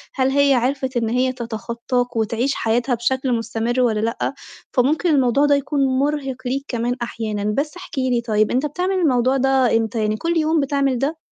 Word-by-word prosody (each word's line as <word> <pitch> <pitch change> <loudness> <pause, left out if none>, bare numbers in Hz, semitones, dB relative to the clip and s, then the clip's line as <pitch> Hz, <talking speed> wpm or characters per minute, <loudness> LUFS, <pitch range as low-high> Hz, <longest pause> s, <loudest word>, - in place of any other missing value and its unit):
هل 260 -1 +2
هي 280 0 +3
عرفِت 260 +1 0
إن 230 -2 0
هي 255 +2 +1
تتخطّاك 235 +1 -3
وتعيش 230 +4 0
حياتها 240 +3 0
بشكل 260 +3 -1
مُستمر 230 +2 -1
والّا 225 -4 +2
لأ؟ 230 +5 -1 0.4
فممكن 290 +7 +2
الموضوع 275 -2 +3
ده 290 0 +4
يكون 280 +1 -2 0.2
مرهِق 280 -2 -1
ليك 270 +3 -2
كمان 240 0 -1
أحيانًا، 220 -3 -3
بس 300 +4 -2
احكِ 355 -4 -10
لي 255 -2 +1
طيب 215 -2 +1
أنت 260 +4 +1
بتعمل 360 +6 -1
الموضوع 265 -7 +2
ده 265 -3 +3
إمتى 225 0 -2
يعني 215 0 0
كل 335 +7 -1
يوم 315 0 +2
بتعمل 275 -2 0
ده؟ 300 +5 -1
255 Hz, 180 wpm, -21 LUFS, 235-280 Hz, 0.4 s, ده